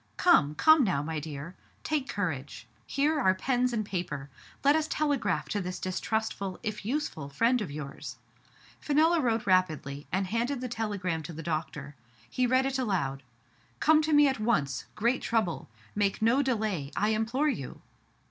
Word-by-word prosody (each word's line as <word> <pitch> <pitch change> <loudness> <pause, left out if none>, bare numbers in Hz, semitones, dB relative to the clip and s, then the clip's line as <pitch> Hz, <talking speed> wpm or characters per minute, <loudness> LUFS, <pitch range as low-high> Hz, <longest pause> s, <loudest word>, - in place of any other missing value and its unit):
Come! 150 - +4
come 315 - +6
now, 170 - 0
my 160 0 -3
dear. 150 +2 -7 0.3
Take 300 -4 -1
courage. 160 -9 -3 0.2
Here 295 +2 +1
are 190 -8 +3
pens 250 +4 +1
and 220 -3 -1
paper. 150 -8 -4 0.3
Let 285 +2 +5
us 315 -1 +1
telegraph 235 - 0
to 205 - -1
this 180 0 -4
distrustful, 200 0 -2
if 215 -1 -4
useful, 215 - -3
friend 230 - +2
of 205 - -3
yours.*' 140 -1 -7 0.6
Fenella 315 +3 +3
wrote 230 -2 0
rapidly, 155 -7 +1
and 190 +2 0
handed 235 +7 -1
the 255 - -3
tele 225 -3 -2
gram 175 -4 -2
to 160 +2 -8
the 165 +1 -7
doctor. 150 -3 -4 0.3
He 255 -1 0
read 255 +2 +3
it 270 0 -1
aloud: 165 - -1 0.3
'* 120 - -35
Come 315 0 +5
to 310 0 -1
me 295 -1 +6
at 265 -4 -1
once. 215 - 0
Great 235 +4 +1
trouble! 220 - -1 0.2
Make 205 -1 0
no 230 +5 +3
delay, 215 - -1
I 210 - +1
implore 230 +7 +1
you 140 - -5
210 Hz, 170 wpm, -29 LUFS, 160-255 Hz, 0.6 s, come